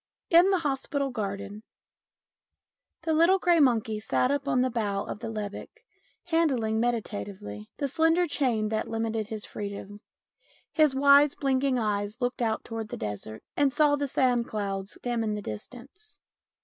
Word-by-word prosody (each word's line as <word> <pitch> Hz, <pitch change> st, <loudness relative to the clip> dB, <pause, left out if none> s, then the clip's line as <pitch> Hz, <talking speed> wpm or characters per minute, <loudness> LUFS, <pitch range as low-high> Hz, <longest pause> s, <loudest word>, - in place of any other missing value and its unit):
II 335 Hz, -, +10 dB
IN 365 Hz, +3 st, +5 dB
THE 385 Hz, -, +3 dB
HOSPITAL 280 Hz, -2 st, -1 dB
GARDEN 200 Hz, -2 st, -5 dB, 1.4 s
THE 320 Hz, -, 0 dB
little 335 Hz, +5 st, +5 dB
grey 350 Hz, -3 st, +3 dB
monkey 225 Hz, -6 st, +2 dB
sat 250 Hz, +4 st, +1 dB
up 285 Hz, -1 st, -1 dB
on 250 Hz, -, +2 dB
the 255 Hz, 0 st, +1 dB
bough 205 Hz, -4 st, -1 dB
of 210 Hz, -, -6 dB
the 225 Hz, -, -5 dB
lebbek, 215 Hz, -, -7 dB, 0.4 s
handling 270 Hz, -11 st, +1 dB
meditatively 200 Hz, -, -3 dB
the 280 Hz, -, -1 dB
slender 325 Hz, +5 st, +3 dB
chain 245 Hz, -9 st, 0 dB
that 220 Hz, 0 st, -2 dB
limited 225 Hz, -1 st, -2 dB
his 215 Hz, -1 st, -6 dB
freedom. 205 Hz, 0 st, -7 dB, 0.7 s
His 305 Hz, -4 st, +4 dB
wise 280 Hz, +1 st, +6 dB
blinking 270 Hz, -1 st, +1 dB
eyes, 210 Hz, 0 st, -1 dB
looked 245 Hz, 0 st, -2 dB
out 225 Hz, -2 st, 0 dB
towards 225 Hz, -2 st, -5 dB
the -, -, -5 dB
desert, 105 Hz, +1 st, -6 dB
and 285 Hz, -2 st, +3 dB
saw 295 Hz, +1 st, +4 dB
the 285 Hz, 0 st, -2 dB
sand 250 Hz, -3 st, +1 dB
clouds 195 Hz, -2 st, -4 dB
dim 240 Hz, -2 st, -1 dB
in 215 Hz, -1 st, -1 dB
the -, -, -3 dB
distance. 255 Hz, -, -9 dB
240 Hz, 160 wpm, -27 LUFS, 210-285 Hz, 1.4 s, II